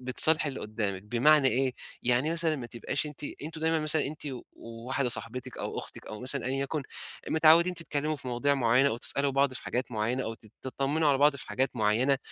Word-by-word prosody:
بتصالحي 155 +5 +5
اللي 135 - -6
قُدّامِك 105 -3 -3
بمعنى 130 +6 +4
إيه؟ 130 +2 0 0.3
يعني 125 +6 +1
مثلًا 165 -2 0
ما 125 -4 -7
تبقاش 120 +5 -2
أنتِ 150 0 -8 0.2
أنتم 155 +1 -7
دايمًا 160 0 +1
مثلًا 155 -1 +3
أنتِ 150 +2 -7 0.3
وواحدة 120 +3 -4
صاحبتِك 125 +2 -3
أو - - -4
أختِك - - -9
أو 105 - -8
مثلًا 130 +1 +2
أي 135 +1 -1
يَكُن، 140 +2 -2 0.5
متعوّدين 165 +3 +5
تتكلّموا 155 -2 -3
في 140 -3 -7
مواضيع 125 +4 +1
معيّنة 130 +1 +3
أو 115 - -2
تسألوا 140 +3 +2
بعض 135 0 +2
في - - -5
حاجات 125 0 -3
معيّنة 115 +4 -1
أو 115 - -4
تت 110 -1 -18
تطّمنوا 140 +4 -1
على 140 -2 +2
بعض 145 0 +4
في - - -6
حاجات 130 +1 -1
معيّنة، 120 +6 +2
135 Hz, 200 wpm, -28 LUFS, 120-150 Hz, 0.5 s, بتصالحي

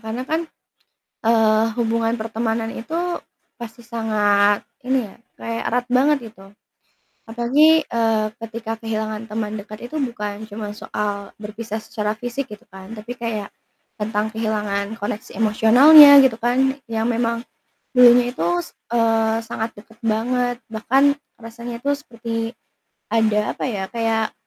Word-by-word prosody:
karena 225 +3 -5
kan, 320 +4 -1 0.9
eee, 220 -1 +4
hubungan 230 0 +1
pertemanan 225 0 -2
itu 240 +8 -8 0.6
pasti 235 0 -9
sangat 210 -3 +2 0.2
ini 255 -4 0
ya, - - -16 0.2
kayak 230 0 -4
erat 245 +1 0
banget 275 +4 +3
gitu. 195 -2 -17 0.7
Apalagi, 285 +8 +4
eee, 225 -4 0
ketika 225 0 -6
kehilangan 220 0 -4
teman 215 0 -4
dekat 210 +2 -10
itu 310 - -3
bukan 215 -5 -4
cuma 210 0 -6
soal 205 -1 -5
berpisah 215 +1 -6
secara 210 -2 -3
fisik 245 +4 -4
gitu 210 +2 -11
kan, 190 +3 -10
tapi 220 +3 -8
kayak 220 -4 -4 0.5
tentang 210 0 -1
kehilangan 210 -2 -2
koneksi 210 0 -6
emosionalnya 270 +7 +8
gitu 250 -4 +2
kan, 265 +4 +1
yang 225 0 -1
memang 230 0 -1 0.5
dulunya 245 0 +6
itu, 170 - -1
s 175 - -9 0.2
eee, 225 -1 +2
sangat 225 -1 -3
deket 225 +2 -18
banget 245 +2 0
bahkan 270 +6 +2 0.2
rasanya 235 +1 -8
itu 285 +3 0
seperti 230 -4 -5 0.6
ada 215 -2 +2
apa - - -4
ya, 200 -5 -3
kayak 225 -1 0
225 Hz, 130 wpm, -21 LUFS, 215-240 Hz, 0.9 s, emosionalnya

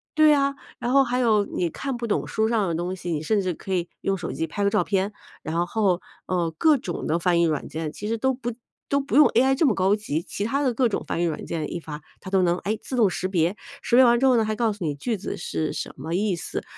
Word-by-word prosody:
对 310 0 +6
呀， 280 -1 +3 0.2
然 240 - -2
后 275 +1 +6
还 250 0 -1
有 215 -4 +3
你 175 - -2
看 270 - -4
不 240 - -4
懂 210 - 0
书 220 0 0
上 220 -5 +1
的 165 - -1
东 175 +3 -2
西， 175 -1 -5
你 155 -2 -1
甚 205 +6 +1
至 185 -2 -1
可 190 +4 -6
以 175 -1 -1
用 195 0 0
手 175 - -5
机 160 - -2
拍 200 +6 -3
个 200 - +4
照 - - +2
片， 195 0 0 0.3
然 170 +2 -1
后， 195 -4 +1 0.3
呃， 175 -3 0
各 310 - +5
种 180 -9 -5
的 165 - +2
翻 175 0 +2
译 - - +4
软 155 -3 -1
件 160 -1 -4
其 205 - -6
实 230 +1 -1
都 265 +3 +1
不 245 -2 -4 0.4
都 280 - +2
不 275 - -3
用 300 - +8
AI 265 +3 +3
这 320 - +3
么 240 - +4
高 190 +2 +3
级， 165 -7 -3
其 200 - -5
他 275 +5 0
的 255 -3 +1
各 245 +1 +2
种 - - -2
翻 170 - -1
译 - - +2
软 165 - -3
件 155 -3 -3
一 175 - -3
发， 150 -1 -7 0.2
它 - - -8
都 190 - +4
能， 175 0 +2
哎， 215 +2 -2
自 260 - -5
动 220 -5 +4
识 185 - -2
别， 175 0 +1 0.3
识 235 - +1
别 260 - +8
完 240 0 +5
之 270 - +2
后 255 -2 +5
呢， 220 - +2
还 215 - -1
告 225 0 +1
诉 200 -4 -6
你 150 - 0
句 220 - -2
子 190 - -5
是 160 -1 -3
什 - - -5
么 155 +5 -5
意 195 +1 +1
思。 170 - -5
200 Hz, 310 characters per minute, -24 LUFS, 175-240 Hz, 0.4 s, 用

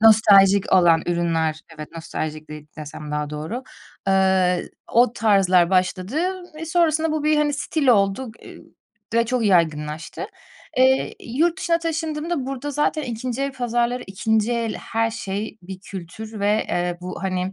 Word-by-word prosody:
Nostaljik 200 -3 +6
olan 170 -3 +5
ürünler, 165 -2 0 0.2
evet, 150 - -7
nostaljik 155 -1 -5
de 150 0 -9
desem 150 0 -8
daha 150 0 -2
doğru. 160 +12 -5 0.4
Eee, 190 -2 +2 0.2
o 240 0 +4
tarzlar 190 -5 +3
başladı 185 +6 0 0.4
ve 310 +1 -6
sonrasında 320 -1 +2
bu 310 -1 -2
bir, 305 0 +3
hani, 300 -1 +2
stil 295 0 -2
oldu, 205 +2 +3
eee, - - -12 0.6
ve 230 0 +3
çok 245 0 0
yaygınlaştı. 160 -4 0 0.5
Eee, 260 +1 +3 0.2
yurt 335 +5 +2
dışına 335 -3 +1
taşındığımda 320 -2 -2
burada 275 +2 -4
zaten 295 +2 0
2'nci 245 +2 -3
el 275 -1 -2
pazarları, 245 0 -1
2'nci 220 +4 0
el 230 -2 -1
her 225 0 -1
şey 210 0 -5
bir 185 +1 -9
kültür 200 +4 -8
ve, 210 +2 +1
eee, 175 0 -1
bu, 180 +2 -7
hani, 185 0 -2
210 Hz, 145 wpm, -22 LUFS, 180-260 Hz, 0.6 s, Nostaljik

